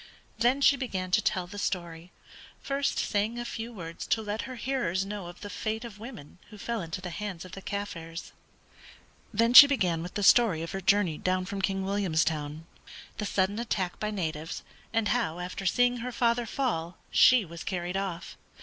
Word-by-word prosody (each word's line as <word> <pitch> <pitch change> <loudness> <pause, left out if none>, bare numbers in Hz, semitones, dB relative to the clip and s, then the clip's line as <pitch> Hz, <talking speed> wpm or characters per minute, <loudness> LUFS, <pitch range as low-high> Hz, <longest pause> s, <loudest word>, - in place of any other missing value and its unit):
Then 250 +4 +3
she 280 0 +6
began 190 -8 -3
to 215 - +4
tell 185 -3 0
the 205 +3 -8
story, 175 -3 -3 0.5
first 275 0 -1
saying 210 +3 0
a 240 - -4
few 230 0 -5
words 170 -6 -7
to 220 - +1
let 210 +1 -3
her 255 - -6
hearers 230 -8 -1
know 200 -3 -5
of 175 - -11
the 205 - -6
fate 220 +1 -3
of 210 -3 -10
women 215 - -10
who 210 - -12
fell 230 +1 -3
into 165 +1 -5
the 180 -1 -5
hands 190 -1 -5
of 185 - -11
the 195 - -8
Kaffirs. 170 -5 -5 1.0
Then 230 +2 +2
she 285 +3 +13
began 185 -12 +1
with 175 +2 -7
the 205 - -1
story 195 -6 +5
of 165 - -5
her 195 - -4
journey 190 -5 +2
down 185 0 0
from 195 +1 -4
King 195 0 0
Williamstown, 160 -5 0 0.5
the 210 - -1
sudden 200 +3 0
attack 195 -6 -2
by 210 - -1
natives, 160 -6 -4 0.3
and 225 -2 +1
how 225 -10 0
after 180 +2 -4
seeing 245 +5 +3
her 245 +1 -4
father 235 0 +1
fall 180 -12 -2
she 250 -5 +6
was 170 0 -9
carried 180 -1 -3
off. 190 -3 -4
195 Hz, 190 wpm, -28 LUFS, 175-230 Hz, 1.0 s, she